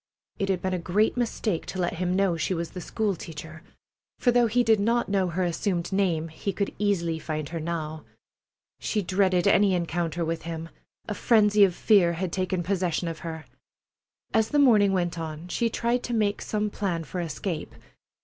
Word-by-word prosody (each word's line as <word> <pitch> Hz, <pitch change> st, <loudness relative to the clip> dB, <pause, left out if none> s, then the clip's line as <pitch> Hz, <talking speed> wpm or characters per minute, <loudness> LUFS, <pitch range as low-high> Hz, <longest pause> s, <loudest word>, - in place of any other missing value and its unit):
It 195 Hz, -, -1 dB
had 185 Hz, -2 st, 0 dB
been 190 Hz, 0 st, 0 dB
a 180 Hz, -, -1 dB
great 195 Hz, +6 st, +1 dB
mistake 225 Hz, -6 st, -1 dB
to 190 Hz, -, -5 dB
let 175 Hz, -1 st, 0 dB
him 180 Hz, +1 st, 0 dB
know 195 Hz, -3 st, +2 dB
she 165 Hz, +3 st, -1 dB
was 170 Hz, 0 st, -4 dB
the 180 Hz, -, -7 dB
school 205 Hz, +3 st, -1 dB
teacher, 160 Hz, -1 st, -9 dB, 0.6 s
for 245 Hz, -, +3 dB
though 240 Hz, -1 st, +4 dB
he 245 Hz, +3 st, +2 dB
did 220 Hz, -2 st, +4 dB
not 230 Hz, +3 st, +1 dB
know 195 Hz, -2 st, +2 dB
her 180 Hz, +2 st, -1 dB
assumed 175 Hz, +1 st, -1 dB
name 170 Hz, -5 st, +1 dB
he 160 Hz, +5 st, -3 dB
could 200 Hz, +2 st, -2 dB
easily 170 Hz, -6 st, 0 dB
find 155 Hz, -2 st, -4 dB
her 165 Hz, -, -4 dB
now. 155 Hz, -1 st, -4 dB, 0.8 s
She 210 Hz, -2 st, -1 dB
dreaded 185 Hz, -1 st, +2 dB
any 200 Hz, -1 st, +4 dB
encounter 170 Hz, -1 st, -1 dB
with 165 Hz, 0 st, -2 dB
him. 165 Hz, 0 st, -6 dB, 0.4 s
A 210 Hz, -, -2 dB
frenzy 210 Hz, -1 st, +4 dB
of 185 Hz, -3 st, +3 dB
fear 185 Hz, -6 st, +4 dB
had 175 Hz, +1 st, -3 dB
taken 185 Hz, -1 st, -1 dB
possession 180 Hz, -2 st, -1 dB
of 165 Hz, -2 st, -4 dB
her. 160 Hz, -1 st, -6 dB, 0.9 s
As 220 Hz, 0 st, +3 dB
the 295 Hz, -, +1 dB
morning 220 Hz, -8 st, +5 dB
went 175 Hz, -3 st, -1 dB
on, 160 Hz, +1 st, -6 dB
she 230 Hz, +5 st, 0 dB
tried 235 Hz, +2 st, 0 dB
to 240 Hz, -, -2 dB
make 210 Hz, -2 st, +1 dB
some 210 Hz, -1 st, -1 dB
plan 180 Hz, -6 st, -2 dB
for 175 Hz, +4 st, -4 dB
escape. 165 Hz, 0 st, -4 dB
185 Hz, 190 wpm, -26 LUFS, 165-205 Hz, 0.9 s, morning